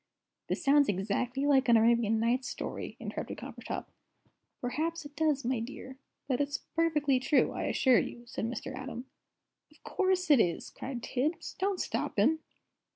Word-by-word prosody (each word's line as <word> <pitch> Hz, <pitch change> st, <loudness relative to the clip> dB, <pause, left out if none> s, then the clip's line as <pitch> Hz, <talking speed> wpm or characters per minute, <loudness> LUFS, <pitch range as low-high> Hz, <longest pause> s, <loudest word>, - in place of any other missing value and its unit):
"This -, -, -2 dB
sounds 285 Hz, -2 st, +5 dB
exactly 220 Hz, +8 st, -1 dB
like 270 Hz, -3 st, +4 dB
an 230 Hz, -, +7 dB
Arabian 225 Hz, -1 st, +3 dB
Nights 245 Hz, +3 st, +1 dB
story," -, -, -5 dB
interrupted -, -, -5 dB
Coppertop. -, -, -6 dB, 0.7 s
"Perhaps 310 Hz, +6 st, -2 dB
it 290 Hz, 0 st, -11 dB
does, 300 Hz, -4 st, +1 dB
my 250 Hz, -1 st, +1 dB
dear. 260 Hz, +2 st, -8 dB, 0.3 s
But 260 Hz, 0 st, +1 dB
it's 285 Hz, 0 st, -1 dB
perfectly 300 Hz, -5 st, +1 dB
true, 270 Hz, +3 st, +3 dB
I -, -, -3 dB
assure 260 Hz, -2 st, +4 dB
you," 240 Hz, -, -5 dB
said 235 Hz, -, -4 dB
Mr. 250 Hz, +3 st, -4 dB
Atom. 260 Hz, -1 st, -6 dB, 0.6 s
"Of -, -, -25 dB
course 370 Hz, -3 st, +1 dB
it 280 Hz, -, +7 dB
is!" 175 Hz, -6 st, 0 dB
cried 255 Hz, -3 st, -6 dB
Tibbs. 290 Hz, +6 st, -2 dB
"Don't 385 Hz, -1 st, 0 dB
stop -, -, -2 dB
him." 320 Hz, +1 st, +4 dB
265 Hz, 155 wpm, -31 LUFS, 240-295 Hz, 0.7 s, an